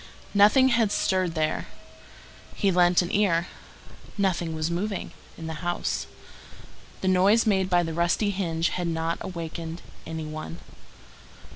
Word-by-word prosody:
Nothing 215 +6 +6
had 230 -4 +2
stirred 185 -5 0
there. 155 -1 -1 0.9
He 200 - +2
lent 175 0 +4
an 175 - -4
ear. 180 -5 +2 0.7
Nothing 175 -5 0
was 155 +1 -1
moving 195 +3 -3 0.3
in 165 - -7
the 160 -1 -6
house. 175 0 -2 0.9
The 190 - -1
noise 190 +5 +4
made 190 -3 +2
by 175 -1 +3
the 165 -1 -4
rusty 170 +5 +1
hinge 170 -4 -1
had 175 -1 -2
not 165 0 -1
awakened 165 -1 -6 0.2
any 160 -1 -4
one. 155 +2 -6
175 Hz, 135 wpm, -26 LUFS, 165-195 Hz, 0.9 s, Nothing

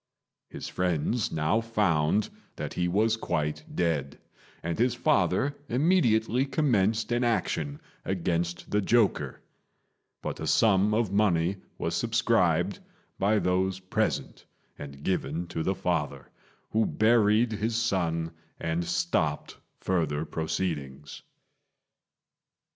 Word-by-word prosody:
His - - -7
friends 90 +5 0
now 80 +8 +1
found 105 -4 +1 0.2
that - - -5
he 90 - 0
was 110 +5 +2
quite 75 -7 -2
dead, 80 -6 -1 0.5
and 85 +3 -3
his 120 +1 +2
father 145 0 +2
immediately 125 -5 +3
commenced 115 -7 +1
an 120 +1 +1
action 80 -11 -1 0.2
against 85 -2 -2
the 105 - +2
joker; 115 +1 +1 0.8
but - - -4
a - - -4
sum 105 -1 +4
of 110 -4 +1
money 95 -3 +2 0.2
was - - -2
subscribed - - +1 0.4
by 105 +3 +3
those 95 -1 +1
present 95 0 -2 0.3
and 70 -1 -10
given 90 -1 -1
to 80 - -3
the 95 +4 0
father, - - -2 0.4
who 110 0 +2
buried 110 +1 +3
his 110 +2 -1
son 85 -8 0 0.3
and 85 +1 -1
stopped 85 -3 -1 0.3
further 80 -4 0
proceedings. 75 -5 -4
95 Hz, 110 wpm, -28 LUFS, 80-110 Hz, 0.8 s, sum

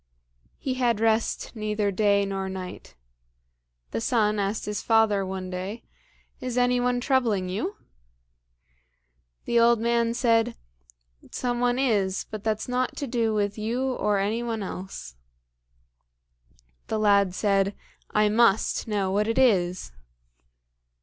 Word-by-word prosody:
He 265 - -2
had 235 -3 +2
rest 225 +2 0
neither 210 -1 -1
day 200 0 +2
nor 195 -1 -3
night. 185 - -8 1.0
The - - -2
son 215 - +1
asked 200 +2 -1
his 210 0 -3
father 220 -3 +3
one 185 -1 -5
day, 190 +5 -5 0.6
"Is 250 -1 -4
any 245 0 +3
one 245 0 +1
troubling 235 -8 +1
you?" 225 - -3 1.7
The 235 - +2
old 235 0 +5
man 235 0 +1
said, 230 -2 +2 0.7
"Some 245 -1 -2
one 245 0 +1
is, 205 -8 +1
but 215 -2 -6
that's 220 -1 -1
nought 250 0 -1
to 285 - -2
do 230 -3 0
with 205 0 -1
you 250 +4 -1
nor 210 -1 +1
any 210 +4 0
one 230 -3 -3
else." 185 - -7 1.7
The 220 - -1
lad 200 -3 +3
said, 200 -1 +1 0.3
"I 210 0 +3
must 220 0 +2
know 200 -3 0
what 210 +2 +1
it 225 +2 -1
is." 185 - +2
215 Hz, 130 wpm, -26 LUFS, 200-235 Hz, 1.7 s, old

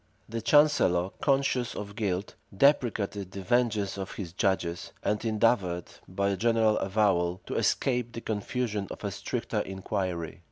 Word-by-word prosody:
The 115 +1 -4
chancellor, 110 -11 +4
conscious 135 -4 +1
of 100 -1 -6
guilt, 100 -3 -2 0.2
deprecated 110 -8 +2
the 95 0 -7
vengeance 105 -2 +1
of 95 - -5
his 90 -5 -6
judges, 90 -3 -1
and 105 +1 0
endeavored, 105 -6 +1 0.2
by 100 +2 0
a 100 - -1
general 115 -1 +3
avowal, 95 -3 +1
to - - -5
escape 125 -3 +1
the 115 - -5
confusion 110 -1 -2
of - - -8
a - - -2
stricter - - -3
inquiry. 95 -3 -3
105 Hz, 145 wpm, -28 LUFS, 95-115 Hz, 0.2 s, chancellor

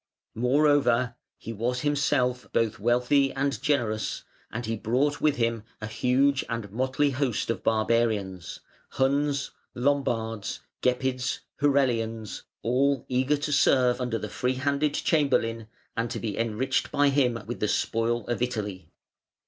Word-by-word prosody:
Moreover, 130 -1 +3 0.2
he 115 - -7
was 125 +4 -1
himself 130 -4 +1
both 110 -2 +1
wealthy 125 +5 +3
and 140 +1 -1
generous, 115 -7 0 0.3
and 120 +2 -4
he 115 +1 -1
brought 130 +7 0
with 150 -2 +3
him 115 -2 0 0.2
a 110 - -5
huge 130 +5 +2
and 115 -4 -4
motley 130 +5 +1
host 130 -4 -1
of - - -5
barbarians, 110 -5 0 0.3
Huns, 140 +1 +1 0.2
Lombards, 120 -5 -1 0.2
Gepids, 125 0 0 0.2
Herulians, 115 -6 +1 0.2
all 135 +2 +1
eager 130 +3 +2
to 145 +1 -3
serve 130 -3 +3
under 120 -2 -1
the 105 - -5
free 125 +4 -1
handed 140 +2 0
Chamberlain, 115 -7 +1 0.3
and 115 +1 -1
to 115 -1 -4
be 105 -2 -3
enriched 115 +4 -1
by 145 0 +3
him 130 -4 +2
with 120 - -5
the 105 - +1
spoil 115 +2 0
of 120 0 -3
Italy. 105 -7 -3
125 Hz, 135 wpm, -27 LUFS, 115-140 Hz, 0.3 s, Moreover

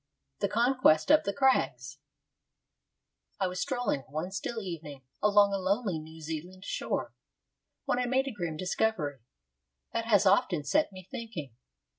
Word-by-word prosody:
III 65 0 -54
THE - - -12
CONQUEST 235 - +4
OF 305 - +6
THE 200 - 0
CRAGS 265 +1 +1 1.4
I 195 - +2
was 180 0 -3
strolling 245 - 0
one 155 +6 -3
still 210 +4 -3
evening 160 -8 -7 0.2
along 205 -1 +5
a 195 - 0
lonely 195 -2 0
New 160 +1 -11
Zealand 170 +5 -6
shore, - - -2 0.7
when - - +1
I 250 - 0
made 260 +2 +1
a - - -2
grim 170 -7 -4
discovery 180 -6 -1 0.7
that 230 0 -1
has 205 -3 +4
often 185 -4 +3
set 300 - +2
me 185 -1 -11
thinking. 170 - -6
190 Hz, 150 wpm, -30 LUFS, 160-225 Hz, 1.4 s, OF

